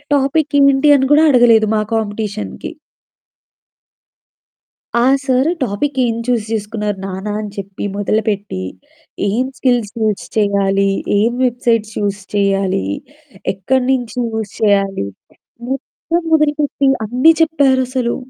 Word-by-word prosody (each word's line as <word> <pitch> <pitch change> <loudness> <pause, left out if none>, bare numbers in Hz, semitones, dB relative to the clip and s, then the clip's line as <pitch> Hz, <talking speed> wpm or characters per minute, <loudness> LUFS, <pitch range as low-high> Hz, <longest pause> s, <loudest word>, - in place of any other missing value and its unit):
టాపిక్కేంటి 280 0 +3
అని 265 0 +1
కూడా 310 +2 +5
అడగలేదు 230 -3 +5
మా 215 - +2
కాంపిటీషన్‌కి. 215 -1 -3 2.3
ఆ - - +3 0.2
సారు 260 +3 +2
"టాపిక్ 260 +6 -2
ఏం 230 - 0
చూజ్ 240 -4 0
చేసుకున్నారు 210 -2 -3
నాన్న" 195 +2 -4
అని 210 - -6
చెప్పి 195 0 -6
మొదలుపెట్టి 205 - -1 0.7
ఏం 235 +6 0
స్కిల్స్ 245 -5 +1
యూజ్ 215 -2 0
చెయ్యాలి? 200 -1 +2 0.3
ఏం 230 +3 +2
వెబ్‌సైట్స్ 230 -3 0
యూజ్ 205 0 -2
చెయ్యాలి? 195 - +1 0.7
ఎక్కడినుంచి 250 +3 -1
యూజ్ 220 -2 -4
చెయ్యాలి? 195 - +1 0.6
మొత్తం 330 +5 -3
మొదలుపెట్టి 295 -2 +1 0.2
అన్ని 255 +8 +4
చెప్పారసలు. 260 -6 +1
225 Hz, 100 wpm, -17 LUFS, 205-265 Hz, 2.3 s, కూడా